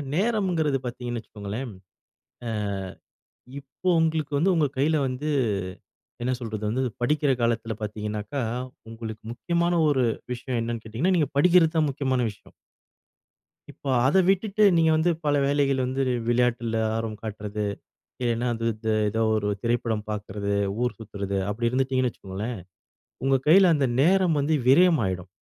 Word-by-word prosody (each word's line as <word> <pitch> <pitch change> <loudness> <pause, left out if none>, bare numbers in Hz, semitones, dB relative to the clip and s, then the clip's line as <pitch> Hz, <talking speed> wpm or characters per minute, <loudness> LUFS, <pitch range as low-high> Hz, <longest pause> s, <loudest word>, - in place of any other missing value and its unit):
நேரம்ங்கிறது 180 -8 +1
பாத்தீங்கன்னு 120 -1 -4
வச்சுக்கோங்களேன், 110 +4 -6 1.5
அ 125 - -21
இப்போ 140 +7 -4
உங்களுக்கு 160 -2 0
வந்து, 185 +6 +3
உங்க 155 -3 +3
கைல 150 +2 +2
வந்து, 130 +4 -3 0.9
என்ன 125 +2 0
சொல்றது, 110 -3 -5
வந்து 130 +4 0 0.2
படிக்கிற 145 +2 +2
காலத்துல 115 -1 0
பாத்தீங்கன்னாக்கா, 105 +4 -4 0.5
உங்களுக்கு 110 -1 -7
முக்கியமான 170 +7 0
ஒரு 135 -3 +2 0.3
விஷயம். 125 0 -3
என்னனு 115 -1 -4
கேட்டீங்கன்னா? 130 - 0
நீங்க 150 -5 +2
படிக்கிறது 170 0 +5
தான் 155 -2 +3
முக்கியமான 130 -2 0
விஷயம். 105 - -17 1.2
இப்போ, 140 - -7 0.2
அதை 170 +8 +4
விட்டுட்டு, 200 +2 +2
நீங்க 160 -1 +4
வந்து 160 +2 +2
பல 145 -1 +3
வேலைகள் 140 -1 +2
வந்து, 130 +2 -2
வி - - +1 0.2
விளையாட்டுல 120 -2 +1 0.2
ஆர்வம் 115 -2 -3
காட்டுறது. 105 -1 -4 0.6
இல்லனா, 120 0 0
அது 115 0 -5
இது 110 +1 -2 0.2
ஏதோ 110 +2 0
ஒரு 105 -1 -1
திரைப்படம் 115 -2 -1
பாக்குறது, 100 -1 -3 0.3
ஊர் 125 - -1
சுத்துறது. 100 -3 -4
அப்படி 115 +3 0
இருந்துடீங்கன்னு 130 -1 +1
வச்சுக்கோங்களேன். 105 +3 -6 0.7
உங்க 135 0 +4
கையில, 180 +1 +7
அந்த 140 -3 +1
நேரம் 180 -1 +3
வந்து 155 +3 +1
விரயம் 165 +1 +5
ஆயிடும். 90 -1 -4
125 Hz, 135 wpm, -25 LUFS, 110-155 Hz, 1.5 s, கையில